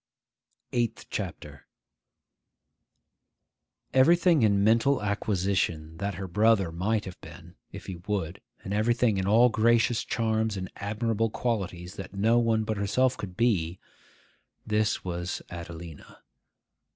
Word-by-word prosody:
EIGHTH 120 Hz, -2 st, -2 dB
CHAPTER -, -, -6 dB, 2.3 s
EVERYTHING 170 Hz, +3 st, +5 dB
in 100 Hz, -3 st, +3 dB
mental 115 Hz, +6 st, +3 dB
acquisition 95 Hz, -6 st, -1 dB
that 100 Hz, +2 st, -3 dB
her 95 Hz, +1 st, -5 dB
brother 105 Hz, -1 st, +3 dB
might 105 Hz, +6 st, -1 dB
have 95 Hz, -1 st, -9 dB
been, 85 Hz, 0 st, -12 dB, 0.2 s
if 100 Hz, -, -9 dB
he 95 Hz, -3 st, -6 dB
would, 100 Hz, -4 st, -2 dB, 0.2 s
and 95 Hz, -, -4 dB
everything 115 Hz, 0 st, +2 dB
in 95 Hz, -, -1 dB
all 115 Hz, +4 st, +6 dB
gracious 115 Hz, +1 st, +2 dB
charms 110 Hz, -2 st, -1 dB
and 95 Hz, -1 st, -5 dB
admirable 110 Hz, +2 st, -1 dB
qualities 95 Hz, -7 st, -3 dB
that 95 Hz, 0 st, -8 dB
no 110 Hz, +4 st, +3 dB
one 115 Hz, -2 st, +2 dB
but 110 Hz, 0 st, -2 dB
herself 125 Hz, +6 st, +1 dB
could 95 Hz, -6 st, -8 dB
be,—this 105 Hz, +1 st, -3 dB
was 90 Hz, -1 st, -4 dB
Adelina. 85 Hz, -2 st, -9 dB
105 Hz, 115 wpm, -27 LUFS, 95-115 Hz, 2.3 s, all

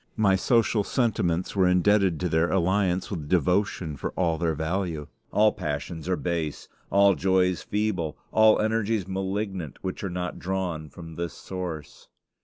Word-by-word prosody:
My 100 Hz, -3 st, +4 dB
social 115 Hz, +1 st, +2 dB
sentiments 95 Hz, -9 st, 0 dB
were 95 Hz, -2 st, +4 dB
indebted 90 Hz, -1 st, +3 dB
to 90 Hz, -, +1 dB
their 80 Hz, +1 st, +2 dB
alliance 95 Hz, 0 st, +1 dB
with 80 Hz, -7 st, -5 dB
devotion 90 Hz, -2 st, +1 dB
for -, -, -4 dB
all 85 Hz, -3 st, 0 dB
their 80 Hz, -2 st, 0 dB
value. 80 Hz, -1 st, -2 dB, 0.3 s
All 105 Hz, 0 st, +4 dB
passions 80 Hz, -1 st, -4 dB
are 90 Hz, -, +2 dB
base, 85 Hz, -4 st, -3 dB, 0.2 s
all 100 Hz, 0 st, +5 dB
joys 90 Hz, +1 st, +2 dB
feeble, 100 Hz, -7 st, -2 dB
all 110 Hz, 0 st, +5 dB
energies 110 Hz, -2 st, 0 dB
malignant, 95 Hz, -4 st, -3 dB
which 95 Hz, +1 st, -4 dB
are 95 Hz, -, -2 dB
not 90 Hz, 0 st, -4 dB
drawn 90 Hz, -4 st, -3 dB
from 80 Hz, +2 st, -10 dB
this 85 Hz, -2 st, -3 dB
source. 90 Hz, -5 st, -7 dB
90 Hz, 150 wpm, -26 LUFS, 85-100 Hz, 0.3 s, all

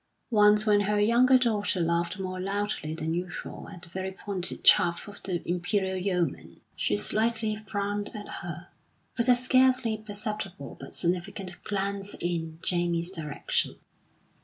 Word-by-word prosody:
Once 210 Hz, -1 st, +6 dB
when 210 Hz, -2 st, +5 dB
her 210 Hz, +1 st, +1 dB
younger 240 Hz, +5 st, +5 dB
daughter 215 Hz, -6 st, +1 dB
laughed 170 Hz, +1 st, 0 dB
more 185 Hz, -1 st, -4 dB
loudly 195 Hz, -5 st, -2 dB
than 160 Hz, 0 st, -2 dB
usual 175 Hz, +1 st, -5 dB
at 175 Hz, -, -11 dB
the 175 Hz, -, -9 dB
very 190 Hz, +2 st, -4 dB
pointed 190 Hz, -1 st, -5 dB
chaff 170 Hz, +4 st, +5 dB
of 205 Hz, 0 st, -9 dB
the 180 Hz, -3 st, -3 dB
Imperial 190 Hz, +2 st, 0 dB
Yeoman, 180 Hz, -4 st, -2 dB, 0.2 s
she 105 Hz, -, +1 dB
slightly 220 Hz, -, +2 dB
frowned 205 Hz, 0 st, -2 dB
at 205 Hz, -1 st, -6 dB
her, 175 Hz, 0 st, -7 dB, 0.5 s
with 240 Hz, 0 st, +1 dB
a 250 Hz, -, +8 dB
scarcely 255 Hz, -2 st, +3 dB
perceptible 205 Hz, -7 st, -5 dB
but 135 Hz, -, -8 dB
significant 180 Hz, +1 st, -2 dB
glance 200 Hz, 0 st, -2 dB
in 165 Hz, -2 st, -2 dB
Jamie's 175 Hz, 0 st, +1 dB
direction. 155 Hz, -6 st, -1 dB
195 Hz, 140 wpm, -28 LUFS, 175-210 Hz, 0.5 s, a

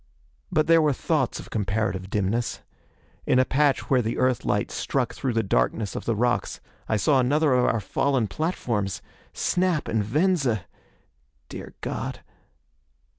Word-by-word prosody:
But 155 Hz, 0 st, +3 dB
there 165 Hz, 0 st, +5 dB
were 150 Hz, -2 st, +3 dB
thoughts 140 Hz, -1 st, 0 dB
of -, -, -11 dB
comparative 100 Hz, -2 st, -1 dB
dimness. 105 Hz, +4 st, -1 dB, 0.7 s
In -, -, +4 dB
a 130 Hz, -, +5 dB
patch 145 Hz, +1 st, +1 dB
where 130 Hz, -2 st, +3 dB
the 115 Hz, 0 st, -2 dB
Earthlight 130 Hz, -2 st, +1 dB
struck -, -, -1 dB
through 130 Hz, -, -2 dB
the 115 Hz, 0 st, +1 dB
darkness 95 Hz, -, 0 dB
of -, -, -5 dB
the 115 Hz, -, 0 dB
rocks, 120 Hz, +3 st, 0 dB, 0.3 s
I 110 Hz, -, +2 dB
saw 135 Hz, +7 st, +3 dB
another 145 Hz, +3 st, +3 dB
of 125 Hz, -1 st, +3 dB
our 115 Hz, -, +2 dB
fallen 130 Hz, +4 st, 0 dB
platforms! 115 Hz, -, -2 dB, 0.3 s
Snap 180 Hz, -4 st, 0 dB
and 110 Hz, -2 st, 0 dB
Venza! 135 Hz, -, +1 dB, 0.8 s
Dear -, -, -9 dB
God.... -, -, -4 dB
125 Hz, 145 wpm, -25 LUFS, 105-145 Hz, 0.8 s, there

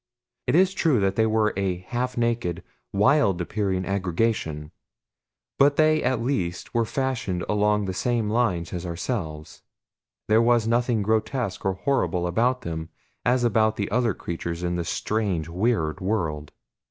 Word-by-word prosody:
It -, -, +2 dB
is 190 Hz, +2 st, +4 dB
true 160 Hz, -, +2 dB
that 95 Hz, -1 st, +1 dB
they 110 Hz, +1 st, +3 dB
were 110 Hz, -1 st, +2 dB
a 95 Hz, -2 st, -1 dB
half 120 Hz, +8 st, -3 dB
naked, 115 Hz, -7 st, -1 dB, 0.3 s
wild 100 Hz, -, +3 dB
appearing 95 Hz, 0 st, -1 dB
aggregation; 90 Hz, -5 st, -1 dB, 0.9 s
but 140 Hz, +1 st, +5 dB
they 155 Hz, 0 st, +4 dB
at 125 Hz, -3 st, 0 dB
least 90 Hz, -10 st, -2 dB
were 115 Hz, -1 st, +2 dB
fashioned 115 Hz, -9 st, -2 dB
along 105 Hz, 0 st, +2 dB
the 95 Hz, -, -3 dB
same 115 Hz, +2 st, 0 dB
lines 105 Hz, -7 st, 0 dB
as 90 Hz, -2 st, -4 dB
ourselves 85 Hz, -, -4 dB, 0.7 s
there 110 Hz, +1 st, +5 dB
was 115 Hz, -1 st, +3 dB
nothing 120 Hz, -2 st, +1 dB
grotesque 110 Hz, 0 st, -1 dB
or 95 Hz, -, +2 dB
horrible 95 Hz, -5 st, 0 dB
about 120 Hz, +8 st, +1 dB
them 80 Hz, -4 st, -5 dB, 0.3 s
as 125 Hz, 0 st, +2 dB
about 110 Hz, -2 st, +3 dB
the 100 Hz, -1 st, -3 dB
other 120 Hz, -2 st, +1 dB
creatures 85 Hz, 0 st, -5 dB
in 90 Hz, 0 st, -1 dB
this 85 Hz, -1 st, -3 dB
strange, 100 Hz, -7 st, -1 dB
weird 90 Hz, -3 st, 0 dB
world. 80 Hz, -7 st, -2 dB
105 Hz, 150 wpm, -25 LUFS, 90-120 Hz, 0.9 s, but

